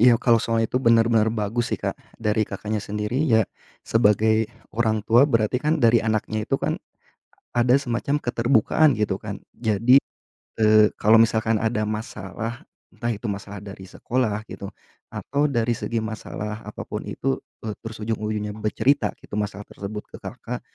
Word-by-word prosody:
iya, 120 +1 +7
kalau 115 -2 +3
soal 115 -1 +1
itu 115 - -2
benar-benar 115 -2 +4
bagus 115 +2 -1
sih, - - -7
Kak, - - -2 0.2
dari 110 -1 0
Kakaknya 105 0 -3
sendiri 105 +4 -3
ya 110 -1 +4 0.4
sebagai 110 0 +3 0.2
orang 110 -2 0
tua 125 +6 +5
berarti 115 0 +2
kan 155 +2 +2
dari 115 0 +6
anaknya 110 -1 -1
itu 135 - +2
kan, - - -1 0.7
ada 120 +1 +4
semacam 140 +2 -1
keterbukaan 120 +5 +3
gitu 100 -3 0
kan. 105 -2 -6
Jadi, 115 +4 +4 0.6
eee, 110 -1 +6
kalau 110 +2 +6
misalkan 110 0 +2
ada 110 -1 0
masalah, 110 +1 -5 0.3
entah 120 - -3
itu 105 +2 -9
masalah 100 0 -5
dari 95 -1 -9
sekolah 110 -3 -1
gitu, 100 - -7 0.4
atau 145 +2 -1
dari 120 -2 +1
segi 115 - -3
masalah 110 0 -5
apa 105 - -7
pun - - -5
itu, - - -2 0.3
e 105 - -2
terus 115 -1 -7
ujung-ujungnya 105 -1 -2
bercerita 110 +3 +1
gitu - - -17
masalah 105 -1 -3
tersebut 105 +1 -6
ke - - -9
Kakak, - - -6
110 Hz, 155 wpm, -24 LUFS, 105-120 Hz, 0.7 s, iya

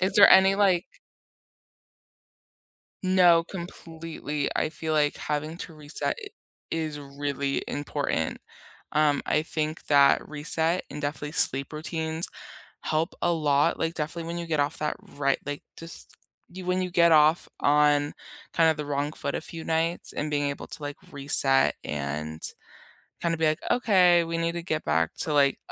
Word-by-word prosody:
Is 190 +1 +1
there 205 - +8
any, 190 +1 +7
like 190 -4 +2 2.2
No, 180 -3 +5
completely, 165 -4 -5
I - - +1
feel 160 0 -4
like 150 -1 +2
having 150 +2 -3
to 165 - -8
reset 150 0 -3
i 415 - -8 0.4
is 155 -2 -3
really 140 0 -3
important. 145 0 -2 0.5
Um, 150 -2 +2
I 155 - +2
think 155 0 -3
that 140 -1 +4
reset 160 +3 0
and 150 - -6
definitely 150 +1 -4
sleep 135 -2 +2
routines 160 +1 -1 0.5
help 160 +3 -1
a 175 - +2
lot, 145 -3 +2
like, 165 +1 -1
definitely 165 +2 -4
when 170 +1 -4
you 170 - -5
get 155 -3 0
off 145 +2 -1
that 150 - -2 0.2
right 140 -1 +1
like, 145 0 -4 0.2
just 165 +1 -10 0.4
you 185 +1 -8
when 180 +1 0
you 180 - -3
get 170 -1 +4
off 155 +2 +4
on 145 0 +3 0.4
kind 165 -1 +5
of 160 - -1
the 150 - -5
wrong 145 +1 -2
foot - - -4
a - - -1
few 165 -1 -8
nights 165 +1 -1
and 150 - -3
being 145 -1 0
able 140 - -5
to, 150 - -5
like, 145 0 -5 0.2
reset 135 -1 +4
and 75 +2 -4 0.8
kinda 170 -1 0
be 160 - +2
like, 155 +2 +1
"Okay, 180 -7 +4
we 165 0 -3
need 165 0 0
to 170 0 -5
get 155 -2 -2
back 80 +1 +1
to, 155 - -1
like, 140 -1 +3
155 Hz, 165 wpm, -26 LUFS, 145-170 Hz, 2.2 s, there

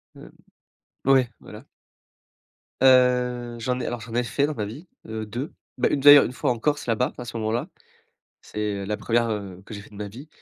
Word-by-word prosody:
Hem, - - -13 0.7
ouais, 130 -3 +4
voilà. 105 +5 -12 1.2
Heu, 125 -2 +3
j'en 125 +2 -1
ai 125 - -3
alors 120 -1 -4
j'en 115 +1 -9
ai 120 - +2
fait 140 +4 0
dans 150 - -2
ma 105 - -2
vie, 135 - -9 0.2
heu, 110 0 -4
2. 120 +8 -5 0.2
Bah - - +2
une 140 - 0
d'ailleurs 145 0 +9
1 125 - -5
fois 125 - 0
en 120 - -3
Corse, 145 +3 -1
là-bas, 120 +2 0
à 125 - -6
ce 120 - -6
moment-là, 110 +2 -2 0.7
c'est, - - -9 0.2
heu, - - -4
la 105 +2 -2
1re, 115 0 +1
heu, 100 -4 -5
que - - -12
j'ai 100 - -7
fait 105 - -15
de - - -16
ma 105 0 -5
vie. 130 +9 -11
120 Hz, 215 wpm, -24 LUFS, 110-130 Hz, 1.2 s, d'ailleurs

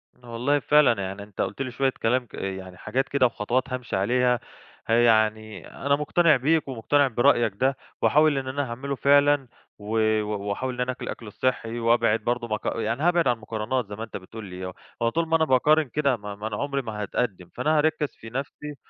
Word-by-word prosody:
أنا 125 - -19
والله 130 +5 +1
فعلًا 140 -7 +4
يعني 100 +2 -5
أنت 100 -1 -6
قُلت 100 +8 -3
لي 130 -2 -3
شوية 135 +2 +1
كلام 125 +2 +1
ك - - -28
يعني 95 -1 -6
حاجات 135 +7 -2
كده 140 -2 +3
وخطوات 120 +2 0
هامشي 125 -5 -4
عليها، 125 +5 +2 0.5
ه - - -2
يعني 110 -4 +2
أنا 140 0 0
مُقتنع 155 +2 +3
بيك، 150 +3 +1
ومُقتنع 135 +3 +2
برأيك 120 -3 +3
ده، 130 +4 +1 0.2
وهاحاول 150 -1 +4
إن 130 -1 -3
أنا 145 +2 -1
أعمله 140 +4 -4
فعلًا، 145 0 +4 0.3
و 105 +1 -8 0.3
وأحاول 105 +5 -3
إن 125 - -4
أنا 125 +1 0
أكُل - - -7
الأكل 115 - -7
الصحي، 120 +1 -2
وأبعد 115 -1 +3
برضو 120 +2 -2
مق 110 -1 -3
يعني 120 +5 -2
هأبعد 175 -3 +3
عن 125 - +3
المقارنات 110 +2 -3
زي 105 - -7
ما 110 - -6
أنت 115 - -6
بتقول 105 +3 -10
لي، 90 0 -7 0.4
هو 115 - +3
طول 165 +5 -1
ما 165 - +2
أنا 160 -1 +3
باقارن 150 +4 +4
كده 140 -1 +1
ما 105 -1 -7
ما 105 +2 -5
أنا 105 - -4
عُمري 140 -1 -1
ما 110 -3 -6
هاتقدم، 100 -4 -3
فأنا 155 +1 +1
هاركز 150 -1 0
في 115 - -11
نفسي 140 +3 -6
125 Hz, 205 wpm, -25 LUFS, 110-140 Hz, 0.5 s, فعلًا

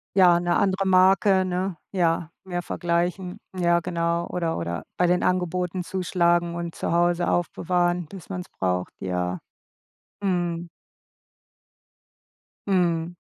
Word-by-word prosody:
Ja, 180 -3 +6
'ne 175 0 +1
andere 195 0 +1
Marke, 190 +1 +5
ne? 185 0 -2 0.2
Ja, 170 -3 +1 0.2
mehr 175 -2 -3
vergleichen, 175 +2 -1 0.2
ja, 170 -1 +3
genau, 170 0 -1
oder 170 -2 -1
oder 85 0 -3
bei 180 - +3
den 180 +1 +2
Angeboten 180 0 0
zuschlagen 175 -2 +1
und 170 -1 -4
zu - - -3
Hause 175 +1 +2
aufbewahren, 175 0 0
bis 190 +1 -11
man 185 -2 -3
es - - -13
braucht, 90 -1 -2
ja. 90 -1 -2 0.8
Mhm. 175 -3 -1 2.0
Mhm. 175 -3 +1
175 Hz, 120 wpm, -25 LUFS, 170-185 Hz, 2.0 s, Ja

